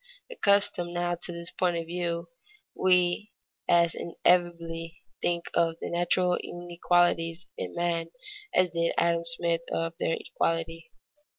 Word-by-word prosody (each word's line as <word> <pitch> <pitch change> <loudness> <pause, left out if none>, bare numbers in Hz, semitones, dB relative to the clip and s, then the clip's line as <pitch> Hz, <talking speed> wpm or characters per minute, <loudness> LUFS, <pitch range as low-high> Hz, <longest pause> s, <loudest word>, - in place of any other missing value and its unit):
Accustomed 200 - +2
now 175 0 0
to 175 0 -4
this 170 0 -5
point 175 -2 0
of 165 - -3
view, 170 0 -2 0.5
we 180 +3 +2 0.4
as 170 -1 +4
inevitably 170 -1 0 0.2
think 170 -1 0
of 165 -1 +2
the - - -5
natural 175 +1 +2
inequalities 175 -1 0
in - - -5
men 170 -1 -1 0.4
as 185 - +3
did 170 0 0
Adam 170 0 +2
Smith 170 0 +1
of 165 0 -1
their 165 - +1
equality. 165 0 -2
170 Hz, 125 wpm, -28 LUFS, 165-175 Hz, 0.5 s, as